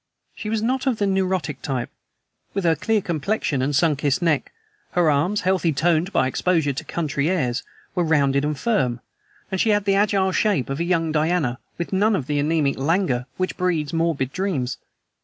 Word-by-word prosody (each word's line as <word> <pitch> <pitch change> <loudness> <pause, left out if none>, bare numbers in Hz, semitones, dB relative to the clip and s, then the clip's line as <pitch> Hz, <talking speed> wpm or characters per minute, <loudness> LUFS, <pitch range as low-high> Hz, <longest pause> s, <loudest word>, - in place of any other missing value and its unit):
She 210 - -6
was 220 0 -1
not 260 +3 0
of 250 -4 +2
the 205 - +1
neurotic 185 -7 -1
type, 130 -4 -3 0.6
with 195 - 0
her 165 -1 +3
clear 220 +2 +1
complexion 160 -4 -1
and 140 +2 0
sun 155 +1 +3
kissed 140 +1 0
neck; 165 -6 0 0.4
her 170 -3 +3
arms, 180 +9 +1
healthily 185 -4 +1
toned 170 +4 +1
by - - +2
exposure 155 +2 +1
to 135 - -5
the - - -11
country 150 -2 -1
airs, 130 -10 0 0.3
were 180 - +1
rounded 140 -4 +2
and 150 0 -1
firm, 130 - 0 0.5
and 190 - 0
she 225 - +2
had 205 -1 +2
the 200 - +3
agile 195 -1 +2
shape 185 - +1
of 135 - -3
a - - +1
young 165 -3 +1
Diana 155 -5 +1 0.2
with 170 +2 -4
none 205 +3 +3
of 145 - -2
the 145 +1 -1
anaemic 145 -2 +1
languor 140 -4 +1
which 185 0 -2
breeds 170 -5 0
morbid 165 -5 0
dreams. 150 -11 -2
165 Hz, 195 wpm, -23 LUFS, 140-190 Hz, 0.6 s, her